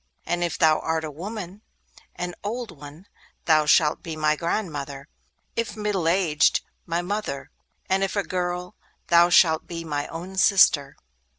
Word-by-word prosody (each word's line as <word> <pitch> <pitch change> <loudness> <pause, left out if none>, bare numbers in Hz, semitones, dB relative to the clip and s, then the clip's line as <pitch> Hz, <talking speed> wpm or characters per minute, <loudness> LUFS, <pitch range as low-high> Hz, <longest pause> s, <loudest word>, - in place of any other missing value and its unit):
And 175 0 -1
if 170 - -2
thou 155 -1 +4
art 160 0 -1
a 155 - -5
woman, 195 +4 -7 0.5
and 180 0 -4
an - - -18
old 230 +3 -4
one, 145 +5 -12 0.4
thou 155 -2 +4
shalt 150 0 +4
be 165 -2 -6
my 155 0 +2
grandmother; 150 -5 -4 0.5
if 230 -1 -3
middle 205 -5 -1
aged, 165 -4 +3 0.3
my 170 +1 -1
mother; 200 -7 -4 0.4
and 190 +1 +1
if 195 - -2
a 200 - +1
girl, 180 0 -3 0.4
thou 170 0 +6
shalt 160 -2 +4
be 165 -1 -6
my 145 -2 -3
own 180 +4 -8
sister. 180 -8 +4
170 Hz, 160 wpm, -24 LUFS, 155-190 Hz, 0.5 s, thou